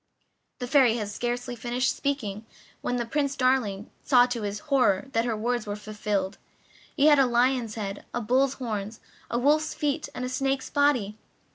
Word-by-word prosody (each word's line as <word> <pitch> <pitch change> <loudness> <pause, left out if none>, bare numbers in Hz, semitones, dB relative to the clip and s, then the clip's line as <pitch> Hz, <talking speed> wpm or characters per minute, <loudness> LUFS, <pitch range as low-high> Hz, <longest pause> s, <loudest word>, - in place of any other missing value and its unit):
The 250 - -4
Fairy 250 -3 +4
had 210 -3 -3
scarcely 245 +3 -3
finished 240 +2 -1
speaking 225 -7 -3 0.3
when 245 -1 -2
Prince 280 +1 0
Darling 255 -7 0
saw 245 -3 +5
to 245 -2 -3
his 205 0 -3 0.2
horror 205 -7 +3
that 230 -1 +1
her 230 -3 -1
words 240 0 -1
were 205 - -3
fulfilled. 210 -2 -3 0.6
He 285 - +4
had 295 -2 +7
a 270 - +5
lion's 245 -2 +1
head, 200 -2 -5
a - - -2
bull's 260 +4 +2
horns, 215 -3 -4 0.3
a 235 - -1
wolf's 300 +5 +2
feet, 295 +1 -1
and 250 - -3
a - - -2
snake's 270 +1 -1
body. 250 -8 +1
245 Hz, 170 wpm, -26 LUFS, 215-270 Hz, 0.6 s, had